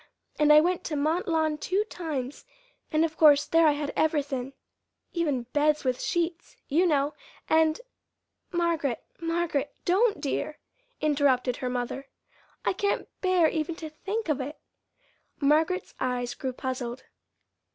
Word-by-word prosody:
And 300 0 +5
I 300 0 +9
went 355 +2 0
to 310 - -2
Mont 310 +5 0
Lawn 315 -2 +1
two 385 +6 0
times, 300 -10 -5 0.5
and 310 +1 +3
of 320 -1 -5
course 295 -2 +6
there 330 -1 +4
I 300 - +5
had 290 0 -3
everythin', 280 -4 0 0.6
even 300 -8 0
beds 300 0 +2
with 255 -2 0
sheets, 345 0 -2
you 340 +6 +3
know; 290 -2 +2 0.3
and 315 0 +3 0.4
" - - -52
"Margaret, 335 -7 0 0.2
Margaret, 330 -4 -1
don't, 415 +4 +3
dear!" 300 +1 -2 0.4
interrupted 275 -4 +2
her 250 - -3
mother. 250 +2 -3 0.6
"I - - +2
can't 405 +2 -1
bear 370 -3 +4
even 315 +1 -2
to 315 -2 -7
think 405 +7 -4
of 295 -3 0
it." 290 +4 -6 0.8
Margaret's 320 +6 +2
eyes 245 -1 -1
grew 260 +1 -4
puzzled. 255 -1 -4
305 Hz, 140 wpm, -27 LUFS, 275-335 Hz, 0.8 s, I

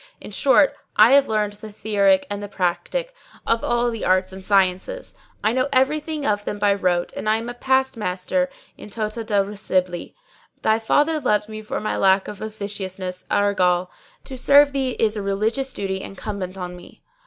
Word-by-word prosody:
In - - -10
short 275 +5 +4 0.2
I 235 - +7
have 280 0 +6
learned 210 -1 0
the 210 +1 -11
theorick 200 -2 +2
and 205 0 -5
the 205 - -5
practick 205 - -2 0.3
of 230 0 +1
all 240 0 +1
the 225 - -5
arts 185 0 +2
and 190 0 -9
sciences; 195 - 0 0.3
I 215 - +3
know 255 +3 0
everything 295 +3 +1
of 205 -1 0
them 205 - -4
by 205 -1 +3
rote 180 -3 0
and 215 - -2
I 215 - +3
am 230 +2 -5
a - - -5
past 265 +1 +1
master 210 +7 -1 0.3
in - - -10
tota 215 +1 -3
re 205 -2 0
scibili. 185 -4 -2 0.5
Thy 220 +1 +3
father 295 +7 +2
loved 210 -5 0
me 215 0 -7
for 215 - -4
my 215 - -2
lack 190 0 +3
of 205 -2 -8
officiousness, 195 -4 -5
argal, 180 -3 +2 0.3
to 260 -1 -8
serve 285 +2 +6
thee 265 -2 -1
is 220 -1 +1
a 210 - -3
religious 215 +7 -1
duty 190 -1 -3
incumbent 195 -1 -6
on 180 -1 -6
me. 180 - -15
210 Hz, 185 wpm, -22 LUFS, 195-245 Hz, 0.5 s, I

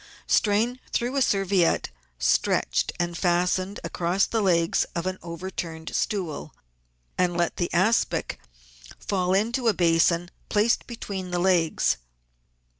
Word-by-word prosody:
Strain 225 +4 +2
through 245 +3 -1
a 275 - +2
serviette 195 - +2 0.3
stretched - - +1
and 175 0 -1
fastened 180 +2 0
across 180 +3 0
the 225 - -1
legs 170 -4 +2
of 170 0 -2
an 185 0 -3
overturned 170 -1 -6
stool, 180 -8 -2 0.6
and 175 -1 +1
let 170 -1 0
the 175 - -1
aspic 190 +7 +1 0.6
fall 185 -2 0
into 235 +5 0
a 220 - +3
basin 170 0 +2 0.2
placed 215 +3 +2
between 200 -6 -6
the 175 - -1
legs. 175 -3 +2
185 Hz, 120 wpm, -25 LUFS, 170-205 Hz, 0.6 s, a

